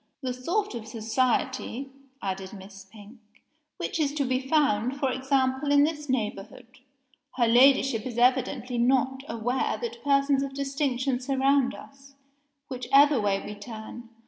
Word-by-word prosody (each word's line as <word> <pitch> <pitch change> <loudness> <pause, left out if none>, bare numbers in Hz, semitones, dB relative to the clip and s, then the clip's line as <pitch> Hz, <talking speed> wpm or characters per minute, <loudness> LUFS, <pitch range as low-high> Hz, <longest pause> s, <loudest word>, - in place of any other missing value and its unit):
"The 255 -1 -2
sort 350 +12 -2
of 230 -2 -7
society," 255 +3 -1 0.3
added 190 0 -4
Miss 195 -1 -11
Pink, 210 +4 -15 0.6
"which - - -3
is 290 -1 0
to 285 -2 0
be 255 0 0
found, 265 -3 +1
for 270 -2 +1
example, 265 +1 0
in 285 0 +6
this 300 -1 -2
neighborhood. 225 -1 -3 0.7
Her 245 -2 +2
Ladyship 255 -1 +4
is 240 -2 -7
evidently 250 0 +1
not 265 +2 +2
aware 235 +3 -1
that 470 0 -6
persons 275 -1 +2
of 275 -1 -4
distinction 275 -2 -1
surround 270 0 +1
us, 275 0 -15 0.5
whichever 275 +1 +3
way 200 -1 0
we 210 - -6
turn. 220 +2 -9
260 Hz, 140 wpm, -27 LUFS, 230-275 Hz, 0.7 s, in